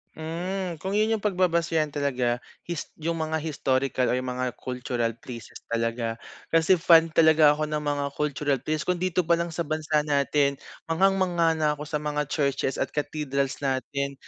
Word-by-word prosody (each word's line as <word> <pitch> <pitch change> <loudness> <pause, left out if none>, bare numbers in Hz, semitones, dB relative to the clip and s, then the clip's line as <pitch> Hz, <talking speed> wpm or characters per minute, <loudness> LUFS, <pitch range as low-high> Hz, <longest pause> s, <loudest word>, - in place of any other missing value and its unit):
Hmm, 175 +3 -4
kung 190 +5 -4
yun 215 +2 +2
yung 215 - -12
pagbabasehan 170 -5 +1
talaga, 130 -4 0 0.2
his 170 -2 -4 0.2
yung 165 +1 -1
mga 160 0 -1
historical 135 -4 0
o - - +1
yung 125 0 -1
mga 125 0 -2
cultural 125 -2 -2
places 120 -2 -9
talaga. 115 0 -2 0.3
Kasi 165 +3 +5
fan 165 -1 +6
talaga 160 -1 +6
ako 150 +1 +1
ng 150 0 -2
mga 145 -1 -1
cultural 145 -3 -1
place. 155 +2 -2
Kung 180 -1 -1
dito 180 -1 +1
palang 170 +1 +2
sa 165 0 -3
bansa 155 0 0
natin 140 -1 +2 0.3
manghang-mangha 175 -1 +2
na 155 -1 +2
ako 150 +1 -8
sa 150 - 0
mga 150 -1 -2
churches 140 -2 0
at - - -2
cathedrals 140 -2 -2
natin. 140 +1 -2
150 Hz, 165 wpm, -26 LUFS, 140-165 Hz, 0.3 s, fan